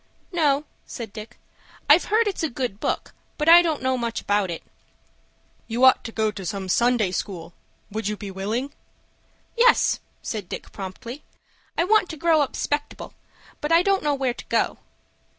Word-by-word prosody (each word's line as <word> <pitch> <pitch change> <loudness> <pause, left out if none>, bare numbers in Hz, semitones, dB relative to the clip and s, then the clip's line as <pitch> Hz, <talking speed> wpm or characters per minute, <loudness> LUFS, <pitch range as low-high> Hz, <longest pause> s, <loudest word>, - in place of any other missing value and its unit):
"No," 300 -4 +2 0.2
said 225 -4 -7
Dick. 220 +2 -9 0.5
"I've - - +6
heard 440 +1 +2
it's 390 - -2
a 320 - 0
good 245 -6 -4
book, - - -2 0.2
but 300 - -1
I 340 +1 +10
don't 320 -5 -1
know 260 -1 +1
much 235 -1 -2
about 205 -2 0
it." 170 - -5 1.0
"You 240 +3 +2
ought 260 - +6
to 225 - -5
go 220 -1 0
to 200 -2 -8
some 190 0 -4
Sunday 235 -2 +2
School. 180 -2 -5 0.4
Would 215 0 -3
you 210 0 -2
be 200 -1 -7
willing?" 220 +9 -3 0.8
"Yes," 485 +1 +4 0.2
said 210 -5 -5
Dick, - - -7
promptly. 215 +8 -8 0.5
"I - - +3
want 415 0 +3
to 320 - -6
grow 320 0 +3
up 285 - -1
'spectable. 290 0 -3 0.5
But 295 - -2
I 335 +1 +6
don't 390 0 +2
know 295 -1 +1
where 265 -3 0
to - - -11
go." - - 0
250 Hz, 175 wpm, -24 LUFS, 210-310 Hz, 1.0 s, I